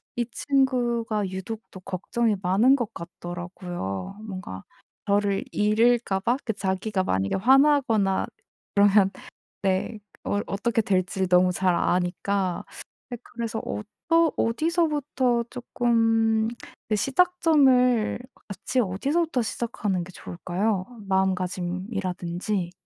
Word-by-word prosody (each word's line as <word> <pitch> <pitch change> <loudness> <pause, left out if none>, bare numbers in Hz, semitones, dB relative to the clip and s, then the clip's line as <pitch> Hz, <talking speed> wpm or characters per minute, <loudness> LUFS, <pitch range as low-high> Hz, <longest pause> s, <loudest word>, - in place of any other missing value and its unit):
이 240 - 0
친구가 240 -6 0
유독 190 +4 -5
또 190 - -10
걱정이 210 +5 -1
많은 210 +9 +5
것 240 -6 -3
같더라고요 175 - -6
뭔가 185 - -7 0.4
저를 200 -1 +1
잃을까 215 0 +2
봐. 240 +6 +1
그 220 - -1
자기가 190 0 -1
만약에 95 - 0
화나거나 255 -4 +3 0.5
그러면 200 -1 +5 0.5
네 195 +3 0 0.3
어 205 - 0
어떻게 225 +3 0
될지를 190 -1 0
너무 180 0 +4
잘 185 0 +2
아니까. 180 +1 0 0.5
예 - - -3
그래서 230 -1 -4
어떠 320 +11 0
어디서부터 290 -3 +1
쪼끔 225 -2 +1 0.4
그 215 - +2
시작점을 270 - +3 0.3
같이 200 +6 -2
어디서부터 270 - 0
시작하는 210 -5 -2
게 180 - -11
좋을까요 185 +3 -2 0.2
마음가짐이라든지? 185 0 -1
210 Hz, 250 characters per minute, -25 LUFS, 185-240 Hz, 0.5 s, 많은